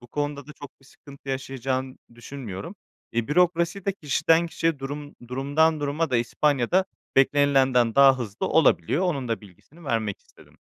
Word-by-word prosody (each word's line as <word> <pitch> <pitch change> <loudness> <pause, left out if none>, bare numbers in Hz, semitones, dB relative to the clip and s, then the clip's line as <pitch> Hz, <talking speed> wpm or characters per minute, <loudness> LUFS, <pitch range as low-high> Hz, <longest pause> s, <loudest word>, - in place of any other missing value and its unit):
Bu 120 - -15
konuda 145 +1 -4
da 150 - -10
çok 145 -2 -13
bir - - -23
sıkıntı 140 0 -15
yaşayacağını 130 0 -3 0.2
düşünmüyorum. 120 - -8 0.4
E, 120 0 -1
bürokrasi 175 +3 +1
de 195 - 0
kişiden 165 0 +2
kişiye, 165 -2 -1
durum 145 +2 -7
durumdan 145 +5 +1
duruma 145 +2 -1
da 125 - +2
İspanya'da 140 +7 +1 0.3
beklenilenden 135 -4 +3
daha 135 -1 +6
hızlı 110 -3 -4
olabiliyor. 155 - +3
Onun 140 -8 -2
da 115 - -2
bilgisini 110 - -18
vermek 110 -7 -2
istedim. - - -22
140 Hz, 150 wpm, -25 LUFS, 125-155 Hz, 0.4 s, daha